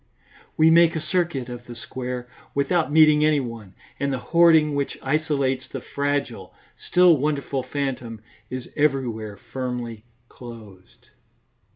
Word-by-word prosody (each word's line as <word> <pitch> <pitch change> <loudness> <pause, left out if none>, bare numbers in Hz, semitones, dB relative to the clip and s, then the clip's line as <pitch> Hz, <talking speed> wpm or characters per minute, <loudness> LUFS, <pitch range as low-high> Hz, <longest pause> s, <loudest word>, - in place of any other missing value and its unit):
We 160 +1 +6
make 170 0 +5
a - - 0
circuit 155 -4 -1
of 120 -1 -9
the 120 - -8
square 125 +1 -6 0.3
without 150 +3 +1
meeting 155 -1 +6
anyone, 120 -10 -1 0.2
and 140 0 0
the 135 - -1 0.2
hoarding 160 -3 +6
which 140 -1 -2
isolates 140 -2 0
the - - -6
fragile, 140 -9 -3 0.3
still 180 -2 +6
wonderful 140 -1 -1
phantom 130 -4 -4 0.3
is 130 -1 -6
everywhere 120 -8 -1
firmly 120 -2 -5 0.2
closed. 110 -8 -13
135 Hz, 125 wpm, -23 LUFS, 120-155 Hz, 0.3 s, We